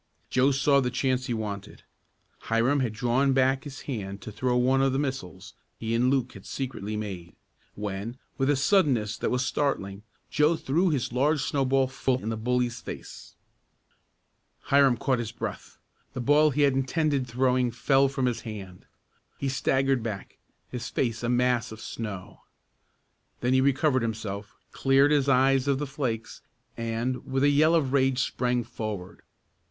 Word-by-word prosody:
Joe 130 +2 +4
saw 140 0 +3
the 125 - 0
chance 130 0 0
he 120 - -1
wanted. 105 -3 -6 0.6
Hiram 120 +6 +2
had 125 -4 0
drawn 125 +4 +1
back 135 +1 +2
his 135 -2 -8
hand 100 -7 -5
to 110 - -7
throw 125 +4 0
one 130 +2 +3
of 135 -1 +2
the - - +1
missiles 135 - -4 0.2
he 115 0 -3
and 120 +2 +3
Luke 130 -2 0
had 100 - -12
secretly 110 -6 -4
made, 95 -5 -6 0.4
when, 105 +3 -5 0.2
with 135 0 0
a 145 - +4
suddenness 135 - +2
that - - 0
was 125 +1 0
startling, 100 -10 -1 0.3
Joe 150 +3 +3
threw 165 +5 +1
his 135 -6 -1
large 145 +3 +2
snowball 135 -2 +2
full 130 -1 -1
in 110 - -2
the 115 - -1
bully's 120 +1 -1
face. - - -9 1.4
Hiram 140 -3 +5
caught 130 0 0
his 115 -2 -4
breath. 115 - -6 0.4
The - - -5
ball 145 +5 +4
he 145 +1 +1
had 140 -2 +4
intended 135 0 0
throwing 125 +1 +1
fell 135 +3 +3
from 135 -1 -1
his 125 -2 -1
hand. 95 -5 -9 0.5
He 140 - -2
staggered 135 -1 +1
back, 105 -4 -6 0.3
his 125 -2 -5
face 115 -3 -1
a 120 - -1
mass 125 -2 +1
of 110 - -9
snow. 105 -5 -7 1.0
Then 125 +1 +1
he 130 - +4
recovered 140 0 +2
himself, 105 -3 -4 0.2
cleared 135 +2 +3
his 140 -2 +3
eyes 135 0 +3
of 140 -1 +2
the 145 - -2
flakes 130 -6 -4 0.3
and, 115 +2 -2
with 135 +1 -1
a 145 - +5
yell 155 +3 +4
of 140 -5 +1
rage 135 -2 +3
sprang 125 -1 0
forward. 110 -5 -6
130 Hz, 165 wpm, -27 LUFS, 115-135 Hz, 1.4 s, Hiram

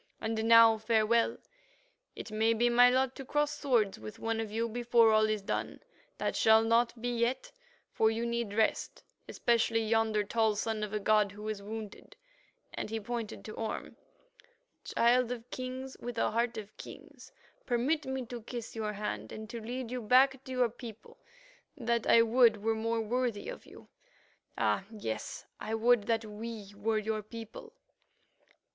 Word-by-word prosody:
And 220 0 -2
now 230 -1 +7
farewell; 225 +1 +2 0.9
may 220 +1 +2
it - - -4
be 240 +2 +3
my 245 +1 +7
lot 260 +1 +1
to 270 - -6
cross 295 +2 0
swords 240 - +1
with 110 0 -9
one 225 0 -2
of 220 -2 -4
you 225 +2 -1
before 235 -1 +3
all 215 0 +4
is 215 -2 -1
done. - - -3 0.4
That - - -2
shall 220 0 +5
not 230 +1 +2
be 245 +2 -2
yet, 250 - -1 0.4
for 220 - +3
you 225 +1 -2
need 235 -3 -2
rest, 220 0 0 0.3
especially 230 -1 +1
yonder 220 -1 +1
tall 220 0 +1
son 220 +1 -2
of 210 -1 -3
a 210 - -1
god 210 -1 +2
who 210 +1 -8
is 210 -2 -4
wounded," 215 0 -8 0.6
and - - -4
he 225 +1 -2
pointed 230 0 -5
to 215 - -7
Orme. 225 -1 -5 0.9
"Child 245 +1 +2
of 240 -1 -6
Kings 260 +1 -5
with 240 0 -6
a - - +1
heart 235 +2 0
of 210 -1 -8
kings, - - -12 0.4
permit 260 +6 +1
me 265 -1 -3
to 240 0 -7
kiss 235 0 -7
your 215 -1 -3
hand 110 - -4
and 220 0 -7
to 235 - -6
lead 245 +2 -5
you 250 -1 -3
back 260 +4 +4
to 260 - -8
your 250 -2 +2
people, 230 -2 -11 0.6
that 235 -3 -1
I 230 - +7
would 230 -2 +4
were 225 0 +2
more 225 +1 -1
worthy 240 - -2
of - - -9
you. - - -14 0.7
Ah! 195 - +1
yes, 110 - -5
I 220 +1 -3
would 225 -1 +3
that 225 -1 0
we 210 -1 -7
were 215 +2 0
your 215 0 -2
people." 230 - -10
225 Hz, 170 wpm, -31 LUFS, 215-240 Hz, 0.9 s, now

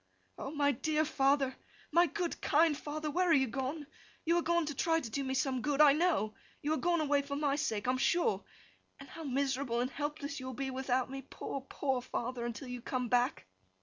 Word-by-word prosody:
'O - - -4
my 285 -1 +2
dear 310 +4 0
father, 275 -2 +2 0.4
my 345 +1 +5
good 355 -2 -3
kind 310 0 +4
father, 300 +1 -4
where 360 +3 +2
are - - +6
you 270 -3 +5
gone? 265 +5 -3 0.4
You 335 +1 +3
are - - +3
gone 340 0 +2
to 295 - -3
try 325 +4 +2
to 250 - -6
do 280 +4 -1
me 265 0 -2
some 260 -2 0
good, 290 +1 0
I 295 -2 +8
know! 305 -10 +1 0.3
You 300 +2 +1
are - - +1
gone 345 0 +1
away 290 -1 +2
for 280 0 -5
my 285 -1 +1
sake, 225 -8 -1
I - - +4
am 255 - -1
sure! 345 - +2 0.6
And 275 - -10
how 325 - -9
miserable 270 -3 0
and 250 +2 0
helpless 290 +1 -4
you 260 - -6
will 260 - -5
be 265 +1 -3
without 260 -1 0
me, 270 0 -5
poor, 275 +1 -6
poor 265 -3 -1
father, 245 -1 -3
until 240 +3 -6
you 250 -1 -5
come 250 0 -2
back! 245 - +1
280 Hz, 220 wpm, -33 LUFS, 260-310 Hz, 0.6 s, I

